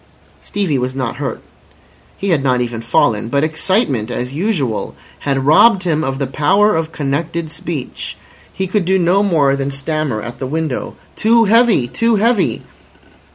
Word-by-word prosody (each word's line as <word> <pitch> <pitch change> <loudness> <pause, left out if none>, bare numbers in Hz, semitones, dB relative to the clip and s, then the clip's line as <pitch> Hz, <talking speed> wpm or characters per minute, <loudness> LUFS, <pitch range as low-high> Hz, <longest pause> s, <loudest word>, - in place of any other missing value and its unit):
Stevie 180 -10 -1
was 130 +1 -3
not 130 -3 -3
hurt, 130 -5 -4 0.7
he 200 - -3
had 160 -6 +2
not 130 -2 +2
even 120 -2 -3
fallen, 115 -1 +1
but 140 +3 +1
excitement 155 - 0
as 125 +2 -4
usual 150 - -2 0.2
had 135 -2 -1
robbed 185 +7 +5
him 160 -3 0
of 135 -1 -2
the 140 - -1
power 190 +10 +2
of 160 0 -2
connected 155 +3 -3
speech. 165 -5 -6 0.3
He 190 - -3
could 190 0 0
do 190 +2 +3
no 180 +2 +3
more 155 -9 +2
than 140 0 -2
stammer 140 -3 -2
at 120 +3 -8
the 130 - -3
window. 155 -1 -3 0.2
"Too 230 +1 +4
heavy. 225 - +4
Too 230 - +1
heavy." 220 0 +1
155 Hz, 160 wpm, -17 LUFS, 135-190 Hz, 0.7 s, robbed